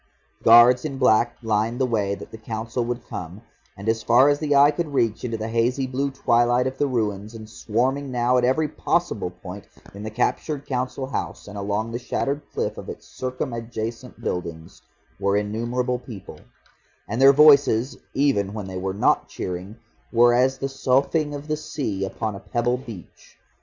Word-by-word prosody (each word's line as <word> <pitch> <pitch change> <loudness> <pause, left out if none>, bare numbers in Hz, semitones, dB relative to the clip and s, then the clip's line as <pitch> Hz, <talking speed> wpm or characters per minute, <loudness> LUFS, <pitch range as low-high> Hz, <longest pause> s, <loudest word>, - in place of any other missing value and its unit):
Guards 120 +2 +7
in 145 -4 -4
black 120 -2 +3
lined 110 +2 0
the 130 - +3
way 105 -5 0
that - - -11
the 110 - -8
Council 115 +2 -3
would 120 +1 -4
come, 90 +6 -7 0.3
and 100 +2 -8
as 115 0 +1
far 125 +5 +5
as 145 0 +2
the 145 -2 +1
eye 140 +1 +7
could 150 -1 -4
reach 115 -4 +1
into 115 -2 -2
the 110 0 -4
hazy 120 +4 +1
blue 135 +2 -1
twilight 120 -2 +2
of 130 0 -4
the 145 - +2
ruins, 110 -3 -2
and 110 -1 -9
swarming 130 +6 -1
now 125 0 +2
at - - -1
every 130 +5 +2
possible 160 - -1
point 90 +2 -10 0.3
in 100 - -9
the 110 - -4
captured 135 +5 -1
Council 130 0 -2
House 130 - -5
and 105 - -9
along 105 +3 -2
the 120 - -3
shattered 140 +3 -2
cliff - - -3
of - - -9
its - - -8
circumadjacent 120 -1 -5
buildings, 85 -2 -5 0.4
were 100 +1 +2
innumerable 120 +4 -1
people, 115 -6 -10 0.7
and 115 +4 -2
their 135 +1 +9
voices, 140 -4 +5 0.2
even 130 -8 +1
when 105 -3 -5
they 95 -1 -5
were 95 +1 -3
not 105 - +2
cheering, 90 +3 -5 0.4
were 120 0 +5
as 130 +2 +2
the 135 - -2
soughing 140 +3 +1
of 145 +1 -8
the 155 - 0
sea 130 -10 -4
upon 110 +2 -3
a - - -7
pebble 120 +2 -1
beach. 115 -8 -12
120 Hz, 180 wpm, -23 LUFS, 110-135 Hz, 0.7 s, their